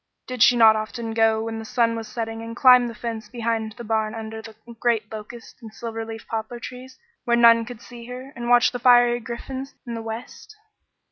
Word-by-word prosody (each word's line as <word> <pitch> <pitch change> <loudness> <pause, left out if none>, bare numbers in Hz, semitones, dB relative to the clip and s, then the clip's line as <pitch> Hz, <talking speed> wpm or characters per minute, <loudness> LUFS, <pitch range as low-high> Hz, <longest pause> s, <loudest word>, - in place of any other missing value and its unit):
Did 255 -2 -6
she 245 +1 +6
not 220 -2 +7
often 225 +1 -4
go 225 0 +2
when 225 0 -4
the - - -6
sun 235 -1 +1
was 225 -1 -6
setting 225 -1 -5
and 230 0 -7
climb 250 -1 +6
the 230 - -7
fence 220 -1 -6
behind 225 -2 -2
the 235 - -10
barn 220 0 -1
under 220 0 -6
the 220 -1 -12 0.2
great 225 -3 0
locust 220 +2 -10
and 225 -2 -10
silver 225 0 -6
leaf 225 0 -8
poplar 225 +2 -4
trees, 255 +2 -10 0.3
where 235 0 +2
none 230 -1 +6
could 240 -1 -10
see 240 -1 -11
her, 255 +3 -9
and 240 0 -5
watch 245 0 +5
the 245 - -5
fiery 240 -1 +5
griffins 260 +3 -7
in 240 - -6
the 230 - -4
west? 225 - -8
230 Hz, 210 wpm, -23 LUFS, 225-245 Hz, 0.3 s, not